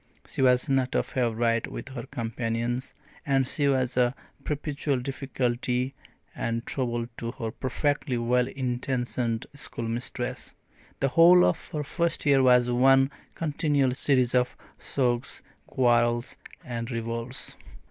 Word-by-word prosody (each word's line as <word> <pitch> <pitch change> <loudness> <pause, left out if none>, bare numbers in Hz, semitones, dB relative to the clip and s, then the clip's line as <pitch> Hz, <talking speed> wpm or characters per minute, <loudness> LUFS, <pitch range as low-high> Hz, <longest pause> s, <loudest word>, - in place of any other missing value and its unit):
She - - -4
was 125 +1 +4
not 135 -2 +1
a - - +3
favourite 115 -2 0
with - - -7
her 130 -1 -7
companions, 120 0 -3 0.3
and 135 -2 +2
she 140 +2 0
was 130 -2 +1
a 125 0 +2 0.3
perpetual 145 -1 -1
difficulty 125 -1 -1 0.4
and 115 0 -2
trouble 120 -3 -2
to 115 0 -4
her 115 -4 -4
perfectly 135 +1 -1
well 125 +1 +2
intentioned 125 -2 -2
schoolmistress. 120 -3 -4 0.5
The 135 - +3
whole 175 +5 +7
of - - 0
her 150 -3 -3
first 170 +2 -1
year 140 -2 +5
was 125 -1 +5
one 135 +2 +5 0.2
continual 145 -4 +1
series 130 -2 +2
of 125 0 +1 0.2
sulks, 125 0 -1 0.2
quarrels, 120 -1 +2 0.3
and 115 -2 -4
revolts. 115 +2 -5
125 Hz, 125 wpm, -27 LUFS, 120-135 Hz, 0.5 s, whole